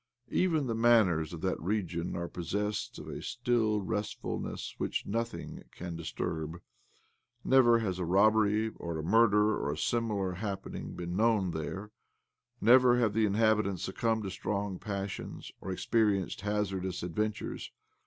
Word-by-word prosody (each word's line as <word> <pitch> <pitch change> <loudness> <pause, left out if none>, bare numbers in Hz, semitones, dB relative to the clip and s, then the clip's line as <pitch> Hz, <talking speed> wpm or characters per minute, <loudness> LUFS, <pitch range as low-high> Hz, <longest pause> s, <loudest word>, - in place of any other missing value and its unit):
Even 160 -6 +2
the 115 - -1
manners 110 -9 +4
of 85 -2 -7
that 95 -1 -1
region 90 -2 -2
are 85 0 -3
possessed 105 +5 -3
of - - -9
a - - -6
still 115 -4 +1
restfulness 105 +1 -4
which - - -2
nothing 115 +3 -3
can 85 -1 -7
disturb. 80 0 -4 0.8
Never 125 -3 +6
has 95 -5 -2
a - - -1
robbery 105 +3 +4
or 85 -2 -4
a 80 - -4
murder 105 +2 +4
or 70 - -2
a - - -7
similar 105 -2 0
happening 95 +2 -5
been 85 0 -4
known 105 -3 +2
there; 90 +7 -5 0.7
never 125 +2 +6
have 115 -4 +2
the 110 0 +3
inhabitants 105 -3 +2
succumbed 110 +3 0
to 95 - -4
strong 100 0 -3
passions, 100 -1 -5
or 95 - -4
experienced 100 -1 +1
hazardous 95 -3 -2
adventures. 105 +5 -3
105 Hz, 140 wpm, -31 LUFS, 90-110 Hz, 0.8 s, Never